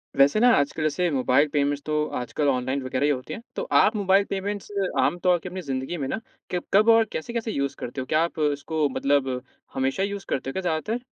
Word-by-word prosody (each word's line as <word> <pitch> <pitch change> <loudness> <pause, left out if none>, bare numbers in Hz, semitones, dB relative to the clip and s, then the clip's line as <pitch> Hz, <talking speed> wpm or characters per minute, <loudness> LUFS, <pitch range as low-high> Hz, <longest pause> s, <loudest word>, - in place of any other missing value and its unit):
वैसे 140 +9 +5
ना, 245 +2 +6
आजकल, 145 +2 0
जैसे 170 +4 +1
मोबाइल 135 +1 +3
पेमेंट्स 145 -1 +1
तो 150 0 0
आजकल 145 +4 -2
ऑनलाइन 130 +1 0
वगैरह 130 +2 -1
ही - - +3
होती 130 -2 -4
हैं, - - -7
तो - - -2
आप 220 - +5
मोबाइल 200 -1 +3
पेमेंट्स 200 +1 -4 0.3
आम 175 - +2
तौर 180 -1 +4
की 180 - -7
अपनी 185 +1 -6
ज़िंदगी 135 +2 -3
में 140 -4 -3
ना 220 - -2 0.3
किब 180 -1 -2
कब 210 +3 +5
और 225 0 +6
कैसे-कैसे 230 +6 -3
यूज़ 140 -6 -2
करते 130 +2 -5
हो? - - -5
क्या 155 +3 +2
आप 170 -1 -4
इसको 150 +1 -1
मतलब 140 0 +1 0.4
हमेशा 135 +7 0
यूज़ 200 0 -4
करते 135 - -2
हो - - -2
क्या 190 - -2
ज़्यादातर? 180 +7 -1
155 Hz, 220 wpm, -25 LUFS, 140-190 Hz, 0.4 s, ना